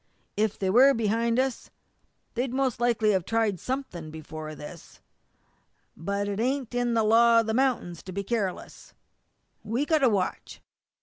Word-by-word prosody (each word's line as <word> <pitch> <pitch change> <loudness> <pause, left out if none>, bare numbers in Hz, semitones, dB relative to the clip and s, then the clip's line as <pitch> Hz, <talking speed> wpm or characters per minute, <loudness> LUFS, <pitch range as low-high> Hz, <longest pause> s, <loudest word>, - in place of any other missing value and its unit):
If 215 0 0
they 190 -1 0
were 265 +6 +6
behind 230 +1 0
us 260 -2 -2 0.6
they'd 250 +1 -2
most 265 -4 0
likely 230 -3 +2
have 190 -3 +1
tried 220 -3 0
something 250 - -5
before 155 0 -8
this. 155 +3 -11 1.0
But 200 +4 -3
it 200 0 -3
ain't 255 +1 -1
in 245 -1 0
the 225 - +3
law 230 +1 +5
of - - -5
the 220 - -1
mount'ins 240 -10 0
to 185 - -7
be 200 +2 -3
careless. 200 -4 -4 0.7
We've 240 +7 -1
got 315 -2 +3
to 265 -3 +4
watch." 195 -4 -2
225 Hz, 160 wpm, -27 LUFS, 195-245 Hz, 1.0 s, were